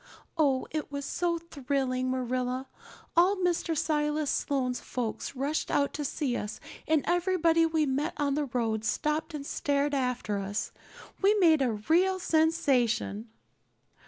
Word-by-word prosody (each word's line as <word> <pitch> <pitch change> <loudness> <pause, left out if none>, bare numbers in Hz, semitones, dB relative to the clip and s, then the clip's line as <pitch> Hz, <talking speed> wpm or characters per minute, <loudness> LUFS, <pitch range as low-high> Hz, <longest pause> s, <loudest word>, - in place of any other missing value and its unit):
Oh, 280 -5 +2
it 305 -2 -3
was 280 -1 -4
so 345 -1 0
thrilling, 270 -5 -2
Marilla. 255 0 -2 0.5
All 360 +4 +5
Mr. 350 -3 0
Silas 300 -1 0
Sloane's 255 -3 -1
folks 240 +1 -4
rushed 280 +4 -1
out 280 0 +1
to 295 - -3
see 275 -2 -1
us 210 -2 -4 0.3
and 310 -2 +3
everybody 340 -2 +3
we 320 -1 +1
met 285 +5 -1
on 285 -1 +1
the 295 +1 0
road 225 -4 -1
stopped 300 +6 -1
and 280 -2 -5
stared 285 0 0
after 250 -6 -1
us. 200 +2 -3 0.5
We 400 +2 +5
made 330 -7 +5
a 250 -4 +2
real 340 - +2
sensation." 270 - +1
285 Hz, 140 wpm, -29 LUFS, 255-320 Hz, 0.5 s, All